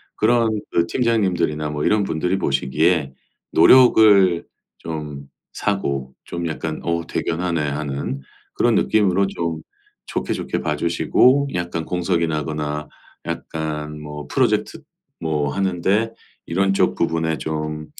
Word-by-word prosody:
그런 115 0 +3 0.2
그 85 0 +2
팀장님들이나 90 -11 0
뭐 75 0 -3
이런 105 -1 +3
분들이 90 +2 -1
보시기에 70 +2 +1 0.4
노력을 100 -4 +6 0.4
좀 75 -3 -6 0.3
사고 70 -10 -2
좀 85 -1 -4
약간 80 0 -4
'어 85 -1 -1
대견하네.'하는 75 -5 -2 0.3
그런 120 -1 +3
느낌으로 100 -2 +2
좀 85 -4 -3 0.5
좋게, - - -2
좋게 - - -3
봐주시고 125 - +2
약간 85 -2 -3
공석이 90 -1 0
나거나 75 -1 -3 0.4
약간 75 -1 -4
뭐 75 0 -7
프로젝트 - - 0 0.4
뭐 75 -3 -1
하는데 100 +4 +1 0.4
"이런 95 +3 +1
쪽 95 - +2
부분에 80 -1 0
좀 75 +1 -4
85 Hz, 255 characters per minute, -21 LUFS, 75-95 Hz, 0.5 s, 노력을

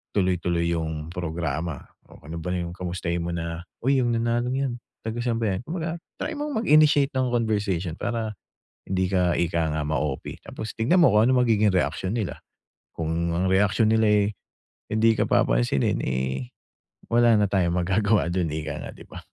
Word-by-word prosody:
tuloy-tuloy 90 -3 +1
'yong 80 -2 -3
programa. 80 -3 -3 0.2
O, - - -16
ano 80 +3 -7
ba 90 +2 -3
'yong 90 -1 -2
kamustahin 85 -1 -3
mo 85 - -3
na, 85 0 -4 0.2
"Uy, 135 +3 +3
'yong 120 -2 +1
nanalong 120 +2 0
'yan, 135 -2 -1 0.3
taga 110 +1 -4
san 115 -1 0
ba 110 - +1
'yan?" - - -5
Kung 170 +2 -4
baga, 165 +1 -3 0.2
try 315 0 -3
mong 295 -6 -2
mag - - -5
initiate 150 -2 +6
ng 130 -1 0
conversation 100 -7 0
para, 110 -3 -3 0.5
hindi 95 -1 0
ka, 90 -2 +2
ika 85 -2 0
nga, 80 - -1
ma-OP. 75 -3 -2
Tapos, 110 - -7
tignan 135 +12 +3
mo 135 - +6
kung 110 +2 +5
anong 125 -1 +4
magiging 105 -2 +3
reaksyon 95 0 0
nila, 110 -6 -3 0.6
kung 80 +1 -1
ang 90 +2 +1
reaksyon 100 +3 +3
nila, 110 0 +3
eh, 105 -1 +4 0.6
hindi 110 +1 +3
ka - - +1
papansinin, - - +2
eh, 65 0 -2 0.6
wala 120 0 +5
na 105 - +3
tayong 90 -4 +1
magagawa 95 +1 +2
do'n, 85 -2 0
ika 75 -1 -4
nga, - - -6
'di - - -14
ba. - - -8
95 Hz, 180 wpm, -25 LUFS, 85-115 Hz, 0.6 s, initiate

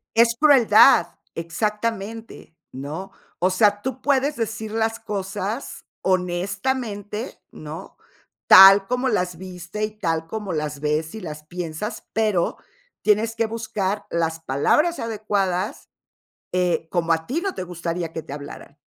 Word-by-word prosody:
Es 230 0 +4
crueldad, 270 -5 +6 0.3
exactamente, 210 +3 -4 0.2
¿no? 150 +9 -6 0.3
O 185 +2 +3
sea, 205 +2 +3
tú 260 +1 -4
puedes 280 0 +1
decir 220 -1 -3
las 225 0 0
cosas 205 +2 -4 0.2
honestamente, 200 +5 -2
¿no? 155 +4 -9 0.5
Tal 195 +1 +9
como 250 +1 0
las 180 -5 -1
viste, 185 +2 -7
y 215 - -1
tal 165 -3 -1
como 210 0 -4
las 150 -2 -3
ves 155 +4 -1
y 220 - -6
las 155 -4 -7
piensas, 175 +4 -5
pero 215 -6 +1 0.5
tienes 220 +2 +2
que 225 0 +1
buscar 215 -3 -3
las 165 -1 -1
palabras 165 - +1
adecuadas 205 -4 -2 0.6
eh, 180 -2 0
como 170 -2 +1
a 160 0 -1
ti 320 +7 -2
no 390 -1 -2
te - - -4
gustaría 170 -1 -4
que 160 - -4
te - - -10
hablaran. 145 0 -9
195 Hz, 135 wpm, -23 LUFS, 170-225 Hz, 0.6 s, Tal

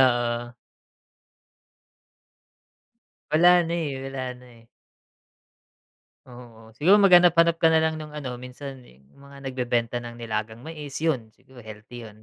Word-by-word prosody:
Oo. 120 -1 +1 2.8
Wala 175 +3 +5
na 170 +1 -3
eh, 145 -6 -3
wala 135 -1 -5
na 125 0 -17
eh. 115 -2 -19 1.6
Oo, 120 -3 -14
siguro 195 +7 +5
maghanap-hanap 175 -3 +5
ka 165 - +3
nalang 160 -1 +2
nung 150 -1 -9
ano, 130 -5 -6
minsan 130 +2 -9
yung 65 +2 -21 0.2
mga 140 0 -14
nagbebenta 125 -3 -2
ng 120 0 -9
nilagang 110 0 -5
mais, 150 -3 -9
yun 140 -9 0
siguro 130 -1 -20
healthy 110 +1 -11
yun 110 0 -16
130 Hz, 125 wpm, -25 LUFS, 120-160 Hz, 2.8 s, Wala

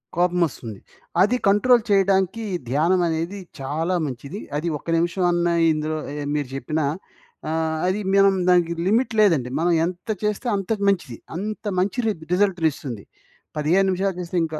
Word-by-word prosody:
కోపమోస్తుంది. 170 - 0 0.4
అది 230 +6 +3
కంట్రోల్ 235 +4 +5
చేయడానికి, 195 +2 +2 0.3
ధ్యానం 165 +7 +2
అనేది 165 +5 -2 0.2
చాలా 160 +7 -1
మంచిది. 140 - -6 0.2
అది 165 +3 -3
ఒక్క 145 - -20
నిమిషం 175 +2 0
అన్నా 175 0 +1 0.2
ఇందులో 155 +1 -2 0.2
ఏయ 145 -1 -4
మీరు 145 -3 -1
జెప్పిన 155 +4 -2 0.7
ఆహ్, 160 0 -1
అది 190 +3 0
మనం 195 -1 +5
దానికి 175 -2 +4
లిమిట్ 235 +5 +2
లేదండి, 155 -12 +3
మనం 175 +1 +2
ఎంత 180 +4 -6 0.2
చేస్తే 210 +4 -1
అంతకి 200 +1 -2
మంచిది. 175 - -1 0.2
అంత 215 +4 -5
మంచి 195 +6 0
రిజ్ 175 -7 -2
రిజల్ట్‌ని 180 -4 +2
ఇస్తుంది. 120 -9 -7 0.5
15 175 +6 +3
నిమిషాలు 190 0 0
చేస్తే 175 +1 -4
ఇంకా 155 -1 -4
175 Hz, 150 wpm, -23 LUFS, 155-195 Hz, 0.7 s, కంట్రోల్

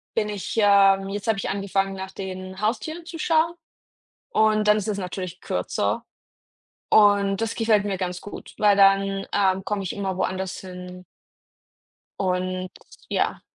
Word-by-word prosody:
bin 210 -2 0
ich, 205 +2 -5
ähm 195 -1 +5
jetzt 205 +2 -5
habe 220 -3 +2
ich - - -3
angefangen, 195 0 -1
nach 190 0 -6
den 185 0 -7
Haustieren 315 +10 -2
zu 345 -1 -8
schauen, 330 +1 +2 0.8
und 215 -1 +3
dann 210 0 +6
ist 210 - -3
es 205 -1 -1
natürlich 185 -1 -5
kürzer. - - -1 0.9
Und 200 -1 +4
das 225 - -1
gefällt 220 -3 +3
mir 195 -2 -1
ganz 180 -1 -4
gut, 205 - -10
weil 205 -1 +4
dann, 195 0 +4
ähm, 190 -1 +2
komme 205 -2 -2
ich 185 - -3
immer 195 -2 -3
woanders 190 0 -2
hin. 180 -1 -9 1.2
Und 185 -1 -1 0.4
ja, - - 0
195 Hz, 150 wpm, -24 LUFS, 190-210 Hz, 1.2 s, dann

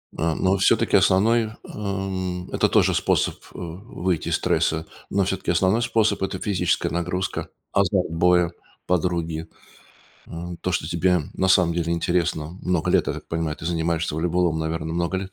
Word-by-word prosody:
А, 80 0 0
но 95 +1 +2
все-таки 95 - +3
основной, 110 +4 +3 0.2
ам, 95 -3 -3
это - - +2
тоже - - +4
способ, - - +1 0.2
а, - - -11
выйти 90 -1 -3
из - - +2
стресса, 80 0 +1 0.2
но 100 0 +2
все-таки 95 -2 -1
основной 95 +6 +2
способ- 115 -2 +1
это 95 -1 -2
физическая 90 -4 0
нагрузка, 90 +2 -2 0.2
азарт - - +2
боя, 90 +1 +3 0.3
подруги, 85 -2 -1 0.8
а, 85 +1 -6
то 90 - -1
что 85 - -1
тебе 90 +1 +2
на 95 - +1
самом 90 -2 +4
деле 85 0 0
интересно. 85 -2 0
Много 90 -3 0
лет, - - +3
я - - 0
так - - -9
понимаю, 80 -2 -2
ты - - -10
занимаешься 85 -1 -1
волейболом, 85 0 +1
наверное 80 0 -3
много 85 +2 0
лет. 95 0 -5
90 Hz, 160 wpm, -23 LUFS, 80-95 Hz, 0.8 s, тоже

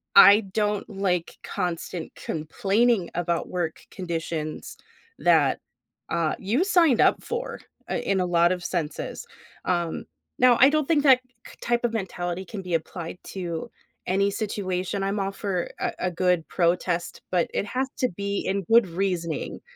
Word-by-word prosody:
I 200 +2 +9
don't 210 0 0
like 190 -4 -1
constant 175 -2 -4
complaining 195 +6 0
about 170 -1 -1
work 175 -3 -2
conditions 165 -3 -4 0.4
that, 155 -6 +4 0.5
uh, 165 -2 0
you 225 - +1
signed 335 - +4
up - - +3
for, 475 +1 -4 0.3
uh, - - -1
in 195 -1 0
a - - +1
lot 175 0 +3
of 180 -1 -3
senses. 165 -5 -3 0.4
Um, 175 -2 -1 0.4
now, 250 -1 +6
I 270 - +8
don't 305 -1 +1
think 310 -4 +3
that 260 -3 +6 0.2
k - - -12
type 240 0 +1
of 230 - -1
mentality 180 -3 -3
can 195 +1 -6
be 180 -2 -5
applied 165 +1 -4
to 180 +3 -5 0.4
any 200 +2 +2
situation, 195 -2 -2
I'm 195 +2 -1
all 195 0 -1
for 195 -3 -2
a - - -1
a 180 - -1
good 180 -1 +1
protest, 175 0 0
but 180 -2 +2
it - - 0
has 260 +4 -1
to 255 - +2
be 200 0 -1
in 195 +1 0
good 230 -2 +7
reasoning. 170 -2 -2
185 Hz, 155 wpm, -25 LUFS, 170-210 Hz, 0.5 s, I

